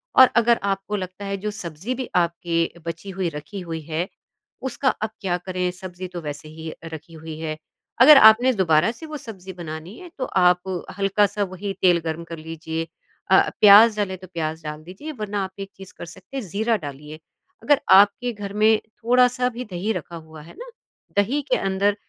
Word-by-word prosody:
और 260 - +9
अगर 235 0 +4
आपको 195 +1 -2
लगता 185 0 -6
है 195 0 -3
जो 210 +2 -4
सब्ज़ी 185 +2 -5
भी 255 -1 -5
आपकी 170 -1 0
बची 170 +4 -6
हुई 185 -3 0
रखी 150 +5 -8
हुई 165 -2 -5
है, 160 +3 -3 0.5
उसका 265 +1 0
अब 220 - -2
क्या 180 -3 0
करें, 180 0 -2
सब्ज़ी 185 0 -8
तो 175 - -5
वैसे 150 0 -7
ही 160 +1 -8
अ, - - -11 0.2
रखी 160 +2 -10
हुई 160 -1 -8
है। 155 -1 -4 0.4
अगर 295 +3 +10
आपने 245 +4 +3
दोबारा 175 -1 +3
से 240 +7 -11
वो 310 -1 -6
सब्ज़ी 190 -7 -10
बनानी 165 +2 -8
है, 360 - -11
तो 260 - -2
आप 180 -2 +1 0.2
हल्का-सा 200 +1 +2
वही 195 +1 -5
तेल 175 -2 +5
गर्म 160 +1 -3
कर 165 0 -8
लीजिए। 160 +1 -5 0.4
अ, - - +6
प्याज़ 210 +1 +8
डले 190 -2 -3
तो 185 +1 -12
प्याज़ 160 -1 -3
डाल 150 0 -6
दीजिए, 190 - -8
वरना 210 -6 -3
आप 190 - -5
एक 195 0 -6
चीज़ 190 0 -12
कर - - -7
सकते 185 +10 -10
हैं, 245 -7 -5
जीरा 220 +5 +1
डालिए। 150 +2 -9 0.4
अगर 290 -1 +4
आपके 205 +5 +5
घर 205 -2 -7
में 215 +1 +4
थोड़ा-सा 250 +2 +2
भी 250 +1 -7
दही 185 +5 -2
रखा 170 - -6
हुआ 160 -1 -11
है 155 - -14
ना, - - -8 0.5
दही 235 +9 +2
के - - +4
अंदर 195 +1 +1
190 Hz, 195 wpm, -23 LUFS, 165-215 Hz, 0.5 s, अगर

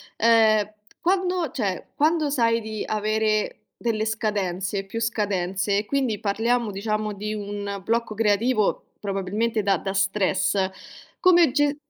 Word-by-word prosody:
ehm, 220 -2 +4 0.3
quando 360 -3 +1
cioè, 200 -7 -3
quando 310 +1 +2
sai 230 -4 +2
di 220 -1 -5
avere 215 0 0 0.3
delle 220 -2 0
scadenze, 200 -3 -2
più 225 +4 -5
scadenze 200 -3 0
e 210 - -4
quindi 260 -4 0
parliamo 225 +3 0
diciamo 215 +2 -2
di 210 +1 -4
un 205 -1 -5
blocco 230 +1 -1
creativo 215 +1 +1
probabilmente 205 +3 -1
da 200 -1 +2
da 195 - -4
stress, 195 0 +1 0.5
come 345 -5 +5
ge 290 +1 +2
215 Hz, 125 wpm, -24 LUFS, 200-230 Hz, 0.5 s, come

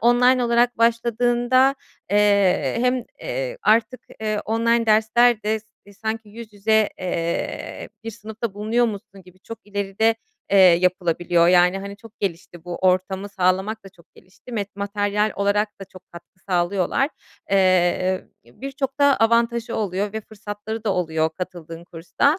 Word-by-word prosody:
online 245 +2 +4
olarak 240 0 +2
başladığında, 240 +3 +2 0.4
eee, 200 -8 +3
hem, 250 -1 +1 0.2
eee, - - -4
artık, 230 +3 +2 0.2
eee, 215 -1 -1
online 230 +1 +1
dersler 220 +1 +4
de 215 +1 0
s 220 - -31 0.4
sanki 220 0 -3
yüz 220 +1 -11
yüze, 215 +1 +2
eee, 170 -2 -3 0.2
bir 225 - -4
sınıfta 220 -1 -6
bulunuyormuşsun 215 -2 -2
gibi 180 0 -19
çok 230 +3 -9
ileride, 205 +2 0 0.4
eee, 200 - +4
yapılabiliyor. 175 -1 +3
Yani, 180 +1 +4
hani, 200 +1 -8
çok 225 +1 -17
gelişti, 175 -2 -5
bu 175 -1 -5
ortamı 190 +2 0
sağlamak 195 +3 0
da 195 - -10
çok 175 -3 -24
gelişti, 205 +6 -16
met 200 -3 -4
materyal 205 +1 -1
olarak 205 +1 +1
da - - -6
çok 185 -1 -15
katkı 175 +2 -14
sağlıyorlar. 185 +8 +1 0.4
Eee, 185 -1 +2 0.2
birçok 270 - -6
da 285 -1 +5
avantajı 235 +1 +1
oluyor 200 -1 -2
ve 220 - -4
fırsatları 215 +1 -7
da 205 - +1
oluyor 160 -2 0
katıldığın 170 -2 -7
kursta. 175 - 0
205 Hz, 140 wpm, -22 LUFS, 185-230 Hz, 0.4 s, da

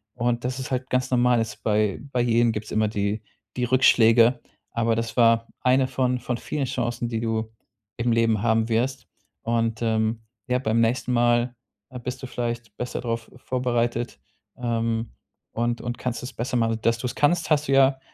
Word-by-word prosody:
und 120 0 -1
das 130 +1 -2
ist 130 - -6
halt 130 0 -2
ganz 125 0 0
normal 125 -1 +3
ist 115 - -6
bei 105 -1 +1
bei 125 - +1
jedem 120 0 +3
gibt 105 -1 -4
es - - -9
immer 110 0 +2
die 105 0 -1 0.4
die 125 - 0
Rückschläge, 120 -1 +5 0.3
aber 115 -1 +1
das 115 0 -3
war 115 -1 +4
eine 130 +1 +3
von 125 -1 0
von 120 -1 -3
vielen 145 +1 -3
Chancen, 120 -2 -2
die 115 -1 -2
du 110 -1 -2 0.5
im 120 0 0
Leben 115 -2 +2
haben 115 0 +2
wirst. 125 +3 -1 0.4
Und, 115 -1 0
ähm, 110 0 0 0.2
ja, 125 - +2
beim 115 -2 +1
nächsten 120 +2 +1
Mal, 120 0 +2 0.4
äh, 125 -1 -8
bist 125 +2 -6
du - - -4
vielleicht 120 -3 -4
besser 125 - -4
drauf 115 -1 -3
vorbereitet. 120 -2 -1 0.4
Ähm, 115 -1 -1 0.4
und 120 +1 -1
und 120 0 -4
kannst 125 -1 -3
es 125 - -5
besser 125 +2 -2
machen. 115 -1 +1
Dass 115 +1 +2
du 115 - -6
es 120 - -4
kannst, 165 +3 +2
hast 150 0 +3
du 135 - +1
ja 135 0 +5
120 Hz, 190 wpm, -24 LUFS, 115-125 Hz, 0.5 s, Rückschläge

